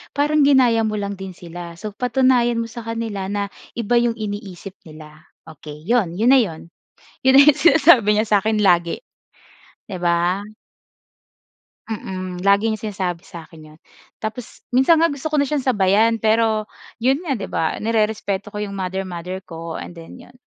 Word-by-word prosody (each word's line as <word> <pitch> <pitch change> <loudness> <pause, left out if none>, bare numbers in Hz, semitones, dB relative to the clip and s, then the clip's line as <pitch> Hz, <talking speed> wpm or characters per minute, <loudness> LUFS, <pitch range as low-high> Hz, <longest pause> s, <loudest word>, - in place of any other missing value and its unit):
parang 295 +2 +2
ginaya 250 -5 +4
mo 215 - -2
lang 200 -1 -3
din 190 -1 -7
sila. 175 0 -9
So, 210 +5 -7
patunayan 245 0 +2
mo - - -7
sa 235 - -7
kanila 225 -4 -4
na 200 0 -3 0.3
iba 235 0 -1
'yong 235 -1 0
iniisip 200 -3 -7
nila." 155 0 -14 0.2
Okey, 150 -1 -12
'yon 200 -4 0
na 245 +7 +5
'yon. 170 -7 -4 0.5
'Yon 265 - +6
na 275 - +10
'yong 295 0 +6
sinasabi 285 -7 +5
niya 215 +1 +1
sa'kin 215 +1 +2
lagi, 175 -4 +2 0.9
'di 190 -3 -5
ba? 175 +3 0 1.4
Mm, 185 -4 -5
lagi 200 +2 +3
niyang 220 -2 -2
sinasabi 185 -5 -3
sa 170 -4 -11
akin 160 -1 -15
'yon. 155 - -18 0.4
Tapos, 220 +2 -7
minsan 265 +6 +5
nga 330 - +4
gusto 285 0 -4
ko 305 - +1
na 285 - +2
siyang 285 -1 -1
sabayan, 220 -1 +2
pero 220 0 +1 0.3
'yon 265 +7 +1
nga 280 -9 -2
'di 200 - -5
ba, 160 - -2
nerespeto 215 -2 -1
ko 210 - -7
'yong 205 -1 -4
mother-mother 185 -1 -4
ko, 165 -1 -7
and - - -8
then 165 +7 -12
'yon. 250 0 -16
210 Hz, 165 wpm, -20 LUFS, 185-240 Hz, 1.4 s, na